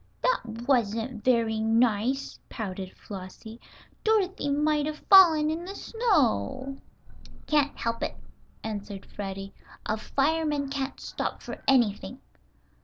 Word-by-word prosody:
"That 235 Hz, -, -1 dB
wasn't 230 Hz, -2 st, 0 dB
very 230 Hz, -3 st, +2 dB
nice," 225 Hz, +3 st, +1 dB
pouted 190 Hz, -4 st, -6 dB
Flossie. 205 Hz, +4 st, -9 dB, 0.4 s
"Dorothy 395 Hz, -8 st, +1 dB
might 295 Hz, +1 st, +2 dB
have 305 Hz, 0 st, -6 dB
fallen 320 Hz, -6 st, +8 dB
in 325 Hz, +2 st, -3 dB
the 385 Hz, +3 st, -7 dB
snow." 275 Hz, -, 0 dB, 0.7 s
"Can't 295 Hz, -2 st, +2 dB
help 230 Hz, 0 st, -2 dB
it," -, -, -2 dB, 0.5 s
answered 205 Hz, -2 st, -5 dB
Freddie. 195 Hz, -1 st, -6 dB, 0.3 s
"A 215 Hz, -, 0 dB
fireman 295 Hz, +3 st, 0 dB
can't 275 Hz, -1 st, -3 dB
stop -, -, -4 dB
for -, -, -7 dB
anything." 245 Hz, -1 st, +2 dB
255 Hz, 110 wpm, -27 LUFS, 220-300 Hz, 0.7 s, fallen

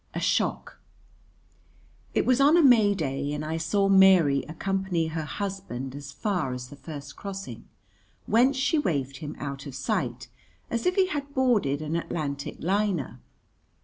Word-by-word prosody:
A -, -, -1 dB
Shock -, -, -1 dB, 1.4 s
It -, -, +2 dB
was 255 Hz, +1 st, +3 dB
on 295 Hz, +5 st, +6 dB
a 340 Hz, -, +5 dB
May 220 Hz, -7 st, +6 dB
day, 140 Hz, -3 st, -2 dB
and 150 Hz, +1 st, -4 dB
I 160 Hz, +1 st, -2 dB
saw 180 Hz, +5 st, +1 dB
Mary 190 Hz, -8 st, +6 dB
accompany 185 Hz, -1 st, -1 dB
her 160 Hz, -1 st, -3 dB
husband 190 Hz, -10 st, -5 dB
as 140 Hz, 0 st, -8 dB
far 170 Hz, -4 st, -2 dB
as 125 Hz, 0 st, -7 dB
the 145 Hz, -, -10 dB
first 145 Hz, -1 st, -9 dB
crossing, 195 Hz, -, -7 dB, 0.6 s
whence 250 Hz, +5 st, +3 dB
she 280 Hz, +4 st, +2 dB
waved 140 Hz, -, -1 dB
him 150 Hz, +1 st, -7 dB
out 140 Hz, -1 st, -6 dB
of 135 Hz, -, -8 dB
sight 125 Hz, -, -2 dB, 0.4 s
as 235 Hz, +4 st, -1 dB
if 365 Hz, -, +2 dB
he 385 Hz, -, +4 dB
had 285 Hz, -4 st, -4 dB
boarded 210 Hz, -, +2 dB
an 155 Hz, +2 st, -3 dB
Atlantic 145 Hz, -4 st, -3 dB
liner. 195 Hz, -3 st, -1 dB
165 Hz, 155 wpm, -26 LUFS, 140-205 Hz, 1.4 s, on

